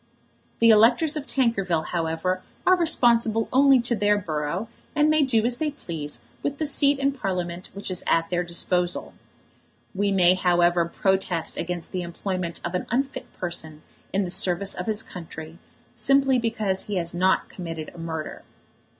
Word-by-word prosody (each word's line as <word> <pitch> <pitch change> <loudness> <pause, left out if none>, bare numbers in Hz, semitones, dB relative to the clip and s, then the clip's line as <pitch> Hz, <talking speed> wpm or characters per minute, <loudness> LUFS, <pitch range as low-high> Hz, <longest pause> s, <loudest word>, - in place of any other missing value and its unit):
The 230 0 +6
electors 235 +8 +4
of 300 -1 -5
Tankerville, 195 - 0
however, 170 +2 -1 0.2
are 370 - +6
responsible 235 -9 +3
only 270 0 +6
to 235 0 -1
their 205 -1 +2
borough, 165 +2 -3 0.3
and 300 0 +4
may 310 0 +3
do 235 -5 +2
as 245 0 0
they 310 +2 -1
please 155 - -7 0.2
with 285 - -3
the 310 - -1
seat 285 -1 +3
in 275 0 +1
Parliament 185 -8 -4
which 200 -1 -3
is 180 - -4
at 165 +1 +1
their 175 0 +1
disposal. 175 +1 -1 0.8
We 200 0 0
may, 180 -2 +5
however, 175 -2 +2
protest 180 -2 0
against 175 0 -4
the 185 - -2
employment 175 0 -4
of 175 - -3
an 180 - -2
unfit 270 +3 -2
person 160 -3 -4 0.3
in 195 +1 +1
the 180 - -5
service 185 +2 +2
of - - -6
his 215 -1 +1
country, 165 -1 -10 0.3
simply 270 -1 +3
because 215 -5 -1
he 205 - -4
has 170 -2 -1
not 185 +2 +2
committed 165 -3 -7
a - - -12
murder. 160 -2 -5
190 Hz, 165 wpm, -24 LUFS, 175-235 Hz, 0.8 s, The